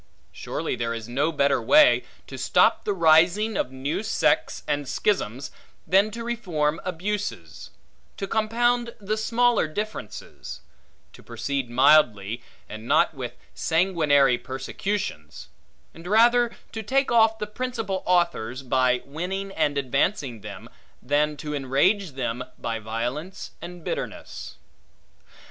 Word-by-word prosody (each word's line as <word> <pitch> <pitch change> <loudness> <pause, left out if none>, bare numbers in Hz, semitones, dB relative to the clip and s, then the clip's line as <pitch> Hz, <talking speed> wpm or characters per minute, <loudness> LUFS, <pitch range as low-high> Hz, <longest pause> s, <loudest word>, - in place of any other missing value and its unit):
Surely - - -4
there 115 0 -2
is 115 -1 -7
no 140 +7 0
better 140 -4 +2
way, 300 - +6 0.2
to - - -9
stop - - +3
the - - 0
rising 175 +5 +4
of 125 - -1
new 130 +7 -3
sects 220 - +1
and 145 -2 -1
schisms, 140 - -1 0.3
than 195 +3 +4
to 230 +2 -6
reform 170 -10 -1
abuses; 200 +4 -4 0.5
to 195 - -3
compound 235 +2 +1
the 210 +1 -2
smaller 235 -2 +2
differences; 155 - -6 0.5
to - - -14
proceed 140 -3 -3
mildly, 120 -5 +4 0.3
and 110 +2 -9
not - - +3
with - - -6 0.2
sanguinary 150 -7 +3
persecutions; 130 - -5 0.4
and 165 +2 -11
rather 235 +4 +5 0.2
to 220 - -5
take 270 +5 +1
off 220 -1 +4
the 210 - -3
principal 225 -3 -3
authors 170 -9 +1
by 125 -1 +2
winning 185 +7 -4
and 145 -5 0
advancing 135 - 0
them, 100 -3 -9 0.4
than 150 +3 +1
to 150 0 -5
enrage 145 +7 +1
them 125 -2 -3
by 115 -1 -3
violence 120 - -4
and 175 -1 -9
bitterness. - - -5
160 Hz, 125 wpm, -25 LUFS, 130-210 Hz, 0.5 s, way